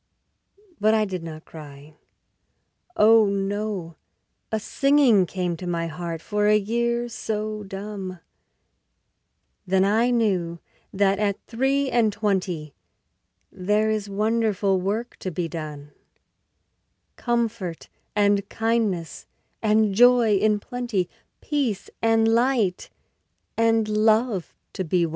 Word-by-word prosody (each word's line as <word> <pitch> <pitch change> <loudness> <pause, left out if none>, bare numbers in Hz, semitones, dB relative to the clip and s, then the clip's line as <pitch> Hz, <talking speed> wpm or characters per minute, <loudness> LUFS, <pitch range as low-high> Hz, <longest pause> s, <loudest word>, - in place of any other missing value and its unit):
But 215 +1 +3
I 215 -1 +2
did 185 -3 -4
not 160 -1 -9
cry. 145 -1 -12 1.0
Oh 220 0 +6
no; 200 -4 -3 0.5
a 220 - 0
singing 270 -6 +3
Came 180 -2 -2
to 180 - -7
my 170 -1 -1
heart 165 0 -5
for 210 -1 0
a 210 0 +5
year 235 +3 -1
so 215 -2 -4
dumb, 195 -2 -7 1.5
Then 190 +1 +3
I 225 +4 +2
knew 190 -8 0 0.3
that 195 0 +2
at 205 -2 0
three 270 +3 0
and 230 -3 +3
twenty 185 -8 -2 0.8
There 210 +3 +1
is 210 -2 -2
wonderful 205 -2 +1
work 215 +6 -3
to 185 - -4
be 175 -1 -3
done, 150 -3 -7 1.2
Comfort 230 -8 -2 0.3
and 205 -1 +2
kindness 220 -7 -1 0.3
and 215 -1 +3
joy 240 0 +5
in 210 +1 +2
plenty, 235 -6 -3 0.3
Peace 265 -10 -2
and 225 0 +3
light 230 -5 +1 0.7
and 225 -1 +2
love 215 -2 +1 0.2
to 190 - -3
be 175 0 +1
won. - - -4
210 Hz, 115 wpm, -24 LUFS, 185-225 Hz, 1.5 s, Oh